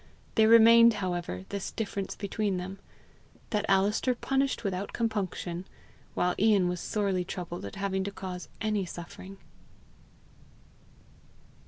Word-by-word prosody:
There 220 0 +5
remained, 230 0 +8
however, 175 - -3
this 200 -1 -4
difference 200 -3 -4
between 200 -1 -2
them 190 +2 -6 0.7
that 210 -2 0
Alister 205 +6 +2
punished 270 +1 0
without 195 -1 -3
compunction, 190 -5 -2 0.5
while 180 0 +2
Ian 205 -3 +4
was 180 -1 -2
sorely 195 -4 0
troubled 175 - -6
at 100 - -7
having 195 -1 -1
to 200 - -3
cause 185 -2 -7
any 215 -2 0
suffering. 180 +2 -9
195 Hz, 120 wpm, -29 LUFS, 180-215 Hz, 0.7 s, remained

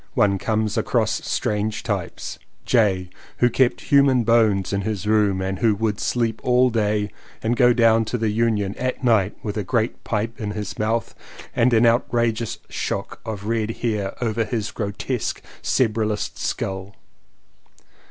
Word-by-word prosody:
One 100 -1 +3
comes 110 0 0
across - - +1
strange 105 0 -1
types. - - -4 0.3
J., 95 -7 +2 0.3
who 120 0 +3
kept 130 0 +2
human 140 -3 +4
bones 110 -5 +3
in 100 - 0
his 105 0 -3
room 105 -3 +2
and 95 0 -3
who 110 -3 +3
would 105 0 -1
sleep 115 -2 -1
all 125 0 +4
day 105 -2 0 0.3
and 115 +2 +1
go 125 0 +5
down 115 -2 +4
to 120 - -2
the 110 -2 0
Union 105 -3 +1
at 130 +1 -2
night 110 -5 +2
with 105 0 -3
a 105 - -1
great 115 +4 -1
pipe 110 +1 -2
in 105 -1 -3
his 105 -2 -5
mouth 110 +2 0 0.4
and 125 +2 +3
an 115 0 +4
outrageous 115 -1 +1
shock - - -4
of 105 -2 -5
red 110 -1 0 0.2
hair 105 -4 -1
over 115 0 0
his 110 -2 -3
grotesque 105 +4 -3 0.2
"cerebralist" 110 -3 0
skull. 95 +1 -3
110 Hz, 150 wpm, -22 LUFS, 105-115 Hz, 0.4 s, go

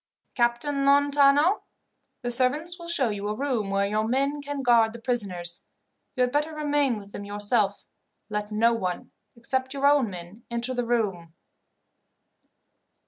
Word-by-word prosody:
"Captain 245 +4 0
Lontano, 285 +5 +4 0.6
the 245 - -2
servants 295 +8 +1
will 340 - -9
show 285 -8 +1
you 205 0 -4
a 210 - -2
room 250 -6 -1
where 195 0 +1
your 210 +2 0
men 275 +4 0
can 285 -1 -5
guard 230 -3 +4
the 235 - -9
prisoners. 195 -8 -2 0.5
You 255 - -1
had 250 0 +2
better 300 +3 -1
remain 290 -5 +1
with 200 -1 -11
them 200 - -7
yourself. 205 0 -1 0.4
Let 210 -1 -4
no 230 +2 +3
one, 185 -6 -3 0.2
except 260 +3 -3
your 275 0 -1
own 285 -5 +4
men, 180 +4 -10
enter 235 +2 -1
the 245 -2 -2
room." 190 -9 -1
240 Hz, 150 wpm, -26 LUFS, 210-280 Hz, 0.6 s, Lontano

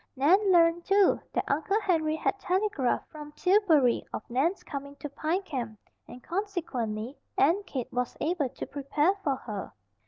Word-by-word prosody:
Nan 375 +9 +4
learned, 340 -1 +4
too, 395 +1 +4
that - - 0
Uncle 320 +9 +1
Henry 325 -7 +1
had 385 +5 -1
telegraphed 370 - 0
from 300 -1 -9
Tillbury 340 - +3
of - - -6
Nan's 310 +10 +1
coming 280 -1 -7
to 295 - -6
Pine 315 +7 -1
Camp, 245 - -5 0.3
and 250 - -11
consequently 285 - -3 0.2
Aunt 350 +8 +3
Kate 255 -4 -5
was 250 -1 -2
able 310 -4 0
to - - -7
prepare 290 +5 +1
for 280 -4 +1
her. 210 -6 -6
310 Hz, 155 wpm, -28 LUFS, 265-370 Hz, 0.3 s, Nan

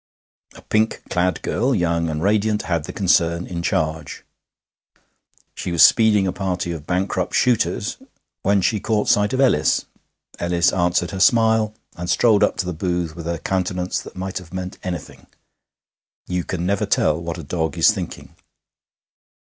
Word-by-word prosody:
A - - -14
pink 110 +1 0
clad 90 0 0
girl, 125 +4 0
young 85 -3 0
and 75 +1 -3
radiant, 105 +1 +1
had 85 -4 -1
the - - -6
concern 85 -3 +1
in 85 -1 -5
charge. 80 -2 -2 1.3
She 90 - -5
was 85 - +5
speeding 110 -4 +5
a 95 - -1
party 90 -3 -2
of 80 -3 -7
bankrupt 90 0 -1
shooters, 120 -3 +1 0.4
when 100 0 +2
she 105 +3 +1
caught 105 +1 0
sight 105 0 +3
of 130 - -1
Ellis. 125 - +3 0.5
Ellis 85 0 +2
answered 90 -1 +1
her 95 - -5
smile, 110 -1 +3 0.2
and 90 0 -6
strolled 110 -4 +4
up - - +1
to 95 - -1
the 90 - -3
booth 85 -1 -2
with 85 -1 -7
a 85 0 -1
countenance 90 0 -2
that - - -12
might 95 +1 -4
have 85 -3 -14
meant 95 0 -6
anything. 90 -5 -7 1.0
You 90 -1 -2
can 90 -2 -3
never 100 +1 0
tell 80 +1 +1
what 85 +1 -5
a 85 - -7
dog 80 +1 -2
is 80 - +6
thinking. 95 -5 -7
90 Hz, 165 wpm, -21 LUFS, 85-100 Hz, 1.3 s, is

